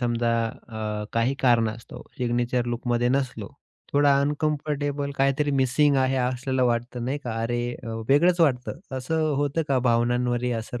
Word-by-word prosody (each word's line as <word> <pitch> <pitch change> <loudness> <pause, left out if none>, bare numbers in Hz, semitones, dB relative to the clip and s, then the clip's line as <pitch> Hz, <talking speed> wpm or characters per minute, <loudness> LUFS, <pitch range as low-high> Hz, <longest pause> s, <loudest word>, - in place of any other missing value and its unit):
समजा 120 -1 +1 0.3
अ, 105 -2 -4
काही 115 +4 +1
कारणास्तव 115 -2 +1 0.2
सिग्नेचर 120 0 0
लूकमध्ये 120 0 0
नसलो. 130 0 -1 0.4
थोडा 145 -1 +4
अनकम्फर्टेबल 145 -1 -1
काहीतरी 140 +2 +1
मिसिंग 140 +2 +3
आहे 130 0 +2
असलेलं 130 +1 0
वाटतं 120 0 -2
नाही 135 +4 -2
का. 115 -2 -3
अरे 120 +1 -1 0.2
अ, - - -9 0.2
वेगळंच 170 +6 +4
वाटतं. 135 -3 +1 0.2
असं 155 +4 -1
होतं 145 +3 0
का 135 -2 +3
भावनांवरही 120 +1 +1
असर 115 +1 -4
125 Hz, 140 wpm, -25 LUFS, 120-140 Hz, 0.4 s, थोडा